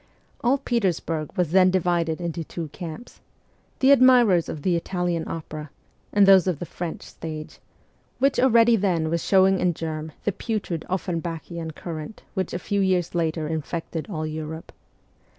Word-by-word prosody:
'All 255 +4 +3
Petersburg 180 - -1
' - - -29
was 175 -4 +1
then 185 0 +6
divided 175 -3 +1
into 170 -1 -3
two 160 0 -6
camps: 175 +8 -9 0.6
the 270 +1 +6
admirers 245 - +6
of 150 - -6
the 180 -2 +2
Italian 175 -1 -2
opera 155 -2 -6 0.4
and 205 -1 +5
those 190 -1 +6
of 180 -5 +1
the 175 - -5
French 170 -1 -6
stage, 155 -1 -8 0.6
which 275 +1 +2
already 235 -2 +5
then 175 -6 0
was 170 0 0
showing 190 -1 +4
in 175 -2 +1
germ 155 -1 -4
the 205 - +1
putrid 195 -6 -3
Offenbachian 170 -2 -4
current 165 +3 -7
which 190 -3 -2
a - - -2
few 200 +3 -2
years 180 -3 +1
later 160 -2 -1
infected 160 +1 -4
all 155 -5 -3
Europe. 155 +1 -6
175 Hz, 155 wpm, -24 LUFS, 160-195 Hz, 0.6 s, then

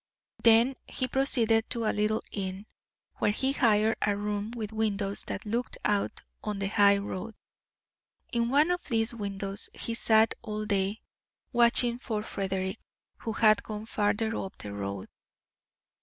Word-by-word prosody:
Then 235 +3 +5
he 255 - -2
proceeded 235 -4 +3
to 230 -2 -1
a - - +1
little 215 +1 0
inn, 190 0 -4 0.5
where - - +1
he 265 +6 +1
hired 225 -5 +3
a 205 -1 +1
room 205 0 -3
with 220 -2 -6
windows 205 -2 0
that - - -5
looked 235 +4 -3
out 205 -1 0 0.2
on 210 -1 -3
the 195 0 -2
high 200 -1 +5
road. 200 +2 -5 1.0
In 235 0 +1
one 295 +6 +4
of 355 0 -1
these 225 -2 0
windows 200 -2 -2
he 230 - -2
sat 220 -1 +3
all 215 -2 -4
day, 200 +1 -1 0.5
watching 240 0 +4
for 215 -4 -3
Frederick, 190 -1 -3 0.4
who 225 - -4
had 215 -2 +4
gone 215 0 -7
farther 220 +1 0
up 190 - -6
the 100 -1 -8
road. 100 -1 -5
215 Hz, 150 wpm, -28 LUFS, 200-230 Hz, 1.0 s, Then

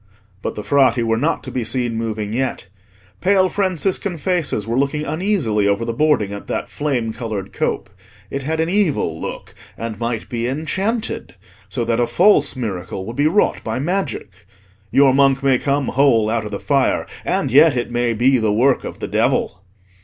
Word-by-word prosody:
But - - -4
the 105 - -5
Frati 130 -3 +3
were 115 0 +1
not 165 +5 0
to - - -7
be 125 - -2
seen 120 0 -1
moving 110 -2 -3
yet. 130 -3 -2 0.5
Pale 190 0 +3
Franciscan 190 -1 -1
faces 160 - -1
were 115 +1 -2
looking 145 +2 0
uneasily 155 - 0
over 100 +3 +1
the 115 - -2
boarding 120 -7 +1
at 100 - -8
that - - -3
flame 125 -7 -1
coloured 110 -5 -5
cope. - - -1 0.4
It 140 - -3
had 160 +4 -2
an 160 - +1
evil 165 - 0
look - - -6 0.2
and 110 -2 -5
might 115 -2 -3
be 120 -1 -2
enchanted, 190 - -2 0.3
so 120 - -2
that 115 0 0
a 120 - +2
false 145 - +4
miracle 95 -6 -4
would 115 - -6
be 145 +3 +3
wrought 195 +7 +1
by 110 +1 -3
magic. 135 - -3 0.4
Your 135 -1 +5
monk 135 0 +3
may 135 -3 +3
come 140 -1 0
whole 120 -5 +3
out 115 -1 -1
of - - -5
the 100 - -4
fire, 140 -2 +1 0.2
and - - -1
yet 145 +1 +6
it 120 0 -2
may 120 -1 0
be 130 +3 +3
the 110 -2 +1
work 125 +5 +2
of - - -7
the - - -3
devil. 90 - 0
130 Hz, 185 wpm, -19 LUFS, 115-150 Hz, 0.5 s, yet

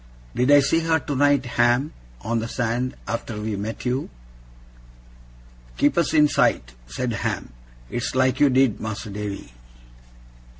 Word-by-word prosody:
'Did 125 +2 +1
I 145 0 +7
see 145 +4 +2
her 165 0 +2
tonight, 145 -2 +1 0.2
Ham, 120 +5 +2 0.3
on 115 +1 -1
the 115 - -3
sand, 125 +1 -2
after 115 -2 -4
we 105 0 -3
met 105 +5 -5
you?' 125 +3 -1 1.7
'Keeping 145 +4 +3
us 165 - -2
in 150 -1 +6
sight?' 60 - +1
said 120 - -3
Ham. 100 - -3 0.3
'It's 120 - -3
like 130 -1 +2
you 145 - +5
did, 130 -3 +2
Mas'r 110 -1 -5
Davy. 100 -10 -6
125 Hz, 140 wpm, -23 LUFS, 110-140 Hz, 1.7 s, I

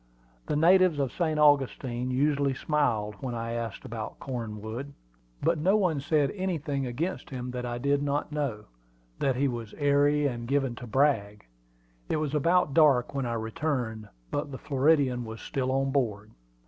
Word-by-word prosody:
The - - 0
natives 180 +1 +5
of 135 -3 0
St. 160 -3 -1
Augustine 135 -4 +2
usually 140 +1 +1
smiled 120 -9 0
when 125 -3 -4
I 115 0 -3
asked 115 -2 -4
about 110 -1 -6
Cornwood; 115 +1 -5 0.5
but 165 +1 +2
no 190 +7 +3
one 180 -8 +1
said 145 0 +1
anything 155 -8 -2
against 160 +10 -3
him 125 -2 -5
that 125 0 -4
I 120 0 -3
did 140 +3 +1
not 145 +1 -1
know 135 -8 -3 0.5
that 135 -2 +1
he 140 +3 +2
was 120 -4 -5
"airy" 145 +1 +3
and 120 -4 -2
given 135 -2 +1
to 125 - -8
"brag." 110 - +1 0.6
It - - +1
was 150 -2 -2
about 165 0 +2
dark 140 -6 +4
when 135 -3 -1
I 120 - -2
returned, 110 -1 -3 0.2
but 145 +1 -2
the 130 - -5
Floridian 135 -3 +2
was 110 0 -7
still 130 -1 -2
on 135 0 +1
board. 110 -6 -1
135 Hz, 165 wpm, -28 LUFS, 120-150 Hz, 0.6 s, natives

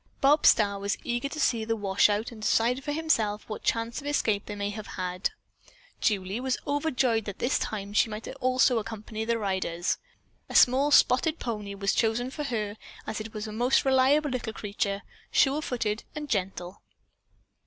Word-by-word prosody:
Bob 290 +2 +5
Starr 200 -2 +4
was 200 +1 -1
eager 240 +3 -2
to 310 - -6
see 235 -6 +2
the 225 +1 -1
washout, 205 +2 +2
and 225 -2 -11
decide 240 +5 +2
for 295 - -3
himself 230 -10 0
what 215 - -6
chance 230 +2 -1
of 285 - -8
escape 220 -8 0
they 210 - -5
might 205 0 -3
have 215 0 -7
had. 180 0 -1 0.7
Julie 200 0 0
was 260 0 -1
overjoyed 270 -6 +1
that 200 - -6
this 245 - +1
time 205 -1 -4
she 220 +1 +3
also 255 +4 +1
might - - +3
accompany 220 0 -5
the 230 0 +1
riders. 190 -4 -1 0.5
A - - -7
small 265 +4 +5
spotted 295 +3 +4
pony 210 -4 -4
was 200 0 0
chosen 235 +3 0
for 295 +1 -4
her, 215 -5 -3 0.3
as 220 0 -4
it 220 0 -9
was 215 0 -4
a 215 - -6
most 245 +6 +2
reliable 270 +3 +3
little 240 -3 -3
creature 200 -1 -3 0.3
sure 280 +2 +3
footed 230 -6 -2
and 300 -1 -5
gentle. 185 -5 -3
225 Hz, 175 wpm, -27 LUFS, 205-260 Hz, 0.7 s, Bob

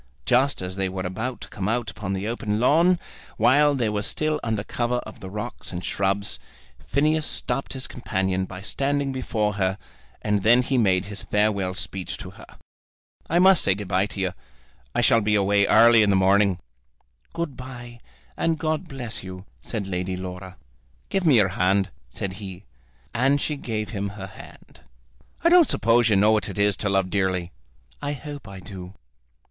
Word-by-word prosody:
Just 130 -3 +2
as 90 +1 -5
they 95 -1 0
were 95 0 -4
about 110 +7 -4
to - - -7
come 100 0 -3
out 115 0 -1
upon 100 -2 -4
the 95 +2 -3
open 110 -2 -2
lawn, 165 +8 +4 0.4
while 145 +6 +4
they 120 -4 0
were 105 -1 -1
still 155 +8 0
under 110 -3 -2
cover 120 +2 -1
of 110 - -10
the 95 - -8
rocks 105 +4 -6
and 90 -1 -5
shrubs, 100 +1 -1 0.5
Phineas 155 +2 +2
stopped 125 +2 -2
his 130 -1 -4
companion 95 -5 -1
by 95 0 -9
standing 140 +4 0
before 110 -5 -1
her, 95 +1 +1 0.5
and 105 -1 +1
then 120 +5 +5
he 135 - -1
made 95 -6 +3
his 105 0 -6
farewell 100 -3 0
speech 90 0 -4
to - - -8
her. - - -14 0.8
"I 170 - +2
must 190 -1 +6
say 95 - +3
good 100 -1 -6
bye 95 +2 +2
to 105 - -8
you. 95 -1 -1 0.6
I - - +3
shall 115 - +5
be 105 0 +2
away 100 0 +3
early 115 0 +7
in 105 - +3
the 100 - +4
morning." 95 0 +4 0.8
"Good 170 -5 -3
bye, 120 -2 -9 0.4
and 165 -1 0
God 155 +3 -2
bless 120 -6 -5
you," 95 0 -9
said 100 - -4
Lady 90 0 -2
Laura. 95 0 -7 0.5
"Give 190 -3 0
me 145 - +6
your 105 -4 +5
hand," 95 +1 +1 0.2
said 95 +9 -5
he. 95 -1 -8 0.5
And 135 +4 +3
she 150 - -1
gave 110 -6 -4
him 100 -2 -3
her 100 -1 -7
hand. 95 - -14 0.6
"I 335 - +5
don't 345 -2 +6
suppose 115 +1 +3
you 105 - +4
know 105 +3 +5
what 105 -4 +1
it - - -7
is 100 -1 +3
to 105 - -1
love 95 -2 +1
dearly." 95 -3 0 0.5
"I 145 0 -2
hope 145 -2 -8
I 100 -1 -9
do." 95 0 -9
105 Hz, 185 wpm, -24 LUFS, 95-125 Hz, 0.8 s, early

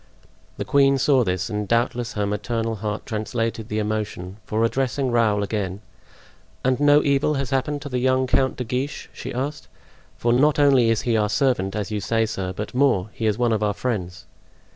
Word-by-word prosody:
The - - -3
queen 140 -1 +4
saw 135 -1 +3
this, 90 -2 -1
and 105 -2 -3
doubtless 120 +1 0
her 105 -1 -1
maternal 110 +2 -2
heart 105 +1 -4
translated 115 0 -3
the 105 - -2
emotion, 105 -3 -3
for 110 +1 0
addressing 130 +2 0
Raoul 110 -4 +2
again: 100 -2 -3 0.9
"And 130 0 +2
no 145 0 +5
evil 140 +1 +2
has 135 -3 -3
happened 145 +2 -1
to 145 - -6
the 125 -1 -1
young 130 +1 +2
Count 130 +1 +1
de 125 - -3
Guiche?" 125 +4 -4
she - - -7
asked; 140 +4 -4 0.5
"for 120 0 +1
not 145 +4 +3
only 135 -5 +5
is 115 -1 +1
he 120 -2 +1
our 105 -1 +1
servant, 105 -6 +1
as 105 0 -3
you 105 - -1
say, 115 +2 +1
sir, 95 -4 -4
but 105 +3 -6
more—he 115 -5 +1
is 105 -1 +1
one 120 -2 +2
of 110 - 0
our 105 -1 0
friends." 95 -7 -3
115 Hz, 190 wpm, -23 LUFS, 105-130 Hz, 0.9 s, no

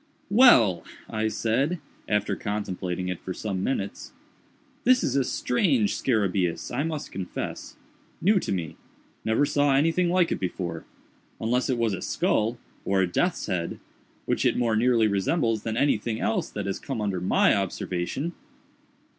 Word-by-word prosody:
"Well!" 130 - +6 0.2
I 110 0 -1
said, 130 +10 0 0.3
after 105 -1 0
contemplating 95 -3 -3
it 90 -2 -3
for 95 - -6
some 95 -3 -3
minutes, 100 -7 -3 0.7
"this 255 +1 +4
is 130 - 0
a 140 - +3
strange 205 - +1
scarabæus, 100 -5 0
I 135 - +1
must 155 -1 -3
confess: 90 -1 -5 0.4
new 200 +2 +4
to - - -4
me: 85 -5 -3 0.5
never 110 +6 +2
saw 145 -1 +2
anything 165 +5 +2
like 180 -1 +2
it - - -1
before—unless 95 +7 -4
it 130 - +1
was 115 -3 +1
a 95 - -4
skull, 115 +3 0 0.3
or 95 -1 +2
a - - +1
death's 175 - 0
head—which 90 -4 -4
it - - +2
more 115 -2 +1
nearly 115 -1 +3
resembles 110 - +1
than 110 +1 -3
anything 115 -5 +1
else 110 - 0
that 105 - -5
has 100 - -3
come 135 -5 -4
under 100 -4 -1
my 90 - +4
observation." 95 - -2
110 Hz, 145 wpm, -26 LUFS, 95-140 Hz, 0.7 s, Well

